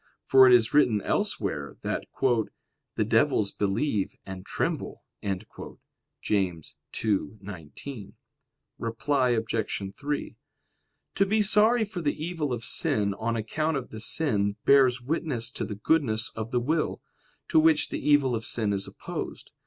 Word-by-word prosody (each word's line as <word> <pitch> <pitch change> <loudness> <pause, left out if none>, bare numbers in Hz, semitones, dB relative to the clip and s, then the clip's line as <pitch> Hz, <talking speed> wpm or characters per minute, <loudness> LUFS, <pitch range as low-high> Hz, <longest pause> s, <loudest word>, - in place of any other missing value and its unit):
For 130 -1 +7
it 125 - +7
is 115 -1 +2
written 125 -8 +4
elsewhere - - -2
that - - -3 0.9
"the - - +1
devils 100 -2 +2
believe 105 +1 -1
and 95 -1 -7
tremble" - - -3 1.2
(James 90 -6 -1
2:19). 100 - -4 0.7
Reply 125 +3 0
Obj. 115 -1 0 0.4
3: 145 0 -4 0.8
To 195 - +3
be 215 +2 +2
sorry 220 +3 +4
for 200 -4 -6
the 150 0 -1
evil 165 -5 -2
of 120 -2 -3
sin 100 -1 +1
on 115 +3 -2
account 150 +8 -1
of 130 - -6
the 110 - -7
sin 105 -7 0
bears 130 -3 +5
witness 130 -5 -2
to - - -4
the 105 - -4
goodness 115 -2 +1
of 110 0 -4
the 125 -1 +1
will, 155 +6 -1 0.5
to 160 - +5
which 155 -1 +4
the - - -3
evil 145 -4 +4
of 115 -1 -2
sin 110 -3 0
is 100 0 -2
opposed. - - -7
120 Hz, 135 wpm, -27 LUFS, 105-150 Hz, 1.2 s, For